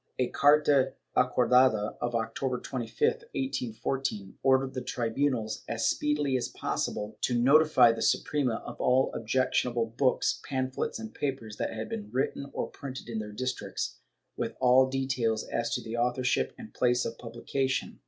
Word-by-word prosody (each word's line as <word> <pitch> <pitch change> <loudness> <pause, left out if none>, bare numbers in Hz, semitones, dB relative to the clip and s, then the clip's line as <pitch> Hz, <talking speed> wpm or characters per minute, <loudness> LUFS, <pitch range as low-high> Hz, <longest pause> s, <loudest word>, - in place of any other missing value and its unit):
A 125 -1 +1
carta 145 -2 +4 0.2
acordada 125 -3 +3
of 120 0 -1
October 125 +2 -1
25, 125 - -6 0.3
1814, 120 - -2
ordered 130 0 +3
the 130 - -3
tribvmals, 120 -1 -1
as 115 -1 0
speedily 150 -2 +1
as 125 - 0
possible, 105 +1 -3
to 120 -1 +1
notify 135 -2 +6
the 115 - -4
Suprema 130 -6 +1
of - - -7
all 130 +1 +3
objectionable 120 0 0
books, 125 +3 +1
pamphlets 130 -2 -2
and 110 -1 -8
papers 125 -7 -4
that - - -2
had 110 0 -5
been 105 -2 -5
written 135 +2 -2
or - - -4
printed 130 -3 -8
in 115 -2 -3
their 105 -1 -6
districts, 125 +4 -4 0.4
with - - -3
all 130 +1 +5
details 130 -4 0
as 115 - -1
to - - -2
author 125 +2 0
ship 125 - +1
and 230 -2 -11
place 125 0 +2
of 115 - -5
publication. 130 +3 -2
125 Hz, 150 wpm, -29 LUFS, 115-135 Hz, 0.4 s, notify